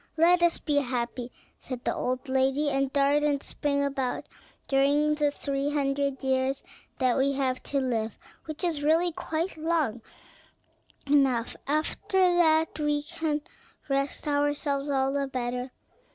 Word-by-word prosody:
"Let 345 Hz, +2 st, +5 dB
us 345 Hz, -1 st, +4 dB
be 295 Hz, -2 st, -1 dB
happy," 245 Hz, -2 st, -2 dB, 0.3 s
said 255 Hz, -2 st, -7 dB
the -, -, +1 dB
old 255 Hz, +1 st, -2 dB
lady, 270 Hz, +3 st, +2 dB
"and 275 Hz, 0 st, 0 dB
dart 280 Hz, +1 st, +3 dB
and 285 Hz, -2 st, +1 dB
spring 280 Hz, -1 st, -1 dB
about 270 Hz, -2 st, -2 dB, 0.4 s
during 285 Hz, +2 st, +3 dB
the 300 Hz, -1 st, +2 dB
three 280 Hz, 0 st, -2 dB
hundred 275 Hz, -1 st, -1 dB
years 265 Hz, 0 st, 0 dB, 0.3 s
that 255 Hz, -2 st, +2 dB
we 275 Hz, +1 st, +2 dB
have 260 Hz, -2 st, -1 dB
to 280 Hz, -, -1 dB
live, 225 Hz, -5 st, -1 dB, 0.3 s
which 310 Hz, +2 st, -5 dB
is 330 Hz, -5 st, 0 dB
really 325 Hz, +4 st, +3 dB
quite 320 Hz, +2 st, -3 dB
long 310 Hz, -8 st, 0 dB, 1.0 s
enough; 270 Hz, -5 st, +2 dB
after 310 Hz, +6 st, -1 dB
that 340 Hz, -4 st, +3 dB
we 295 Hz, -1 st, 0 dB
can 300 Hz, 0 st, -2 dB, 0.5 s
rest 275 Hz, +2 st, -1 dB
ourselves 290 Hz, -1 st, 0 dB
all 270 Hz, -1 st, +1 dB
the 280 Hz, -1 st, 0 dB
better. 250 Hz, -1 st, -3 dB
280 Hz, 140 wpm, -27 LUFS, 265-300 Hz, 1.0 s, Let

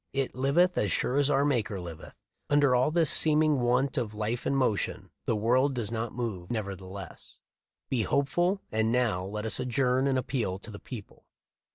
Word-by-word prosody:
It 135 Hz, -2 st, -1 dB
liveth 140 Hz, +8 st, +2 dB
as 100 Hz, -, 0 dB
sure 130 Hz, -, 0 dB
as 145 Hz, 0 st, +3 dB
our 140 Hz, 0 st, +3 dB
Maker 115 Hz, -8 st, 0 dB
liveth. 85 Hz, -3 st, -9 dB, 0.3 s
Under 145 Hz, -2 st, +4 dB
all 125 Hz, +3 st, +3 dB
this 165 Hz, -1 st, +2 dB
seeming 155 Hz, -2 st, +4 dB
want 125 Hz, +3 st, +1 dB
of 110 Hz, -3 st, -4 dB
life 110 Hz, +3 st, -2 dB
and 140 Hz, -, +1 dB
motion, 120 Hz, -6 st, -1 dB, 0.2 s
the 115 Hz, -, +2 dB
world 130 Hz, +6 st, +2 dB
does 115 Hz, -3 st, -2 dB
move 115 Hz, -5 st, -4 dB
nevertheless. 95 Hz, -4 st, -6 dB, 0.5 s
Be 125 Hz, -3 st, 0 dB
hopeful, 175 Hz, -, +1 dB
and 110 Hz, +1 st, +1 dB
now 115 Hz, -7 st, +1 dB
let 105 Hz, +3 st, -5 dB
us 110 Hz, -, +2 dB
adjourn 130 Hz, +1 st, +1 dB
and 135 Hz, -1 st, +1 dB
appeal 125 Hz, -7 st, -2 dB
to 100 Hz, +2 st, -10 dB
the 100 Hz, -, -9 dB
people." 115 Hz, -6 st, -10 dB
125 Hz, 175 wpm, -28 LUFS, 105-140 Hz, 0.5 s, Under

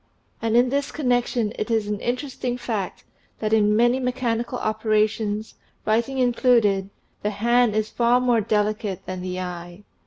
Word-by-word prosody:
And 225 Hz, 0 st, +2 dB
in 245 Hz, +1 st, +4 dB
this 280 Hz, +1 st, -1 dB
connection 245 Hz, -5 st, 0 dB
it 215 Hz, -, -2 dB
is 225 Hz, -2 st, +1 dB
an 205 Hz, -1 st, -3 dB
interesting 250 Hz, 0 st, -3 dB
fact 215 Hz, -6 st, -4 dB, 0.3 s
that 215 Hz, 0 st, -1 dB
in 210 Hz, -1 st, +4 dB
many 240 Hz, +3 st, +3 dB
me 250 Hz, -1 st, 0 dB
chanical 240 Hz, -1 st, -2 dB
operations, 215 Hz, -1 st, 0 dB, 0.3 s
writing 230 Hz, +5 st, +1 dB
included, 235 Hz, -6 st, +3 dB, 0.3 s
the 210 Hz, -, 0 dB
hand 235 Hz, +2 st, +2 dB
is 215 Hz, 0 st, -1 dB
far 240 Hz, +1 st, +3 dB
more 245 Hz, -3 st, +2 dB
delicate 210 Hz, -2 st, -1 dB
than 185 Hz, -1 st, -5 dB
the 185 Hz, 0 st, -4 dB
eye. 175 Hz, +1 st, -7 dB
220 Hz, 155 wpm, -23 LUFS, 210-245 Hz, 0.3 s, in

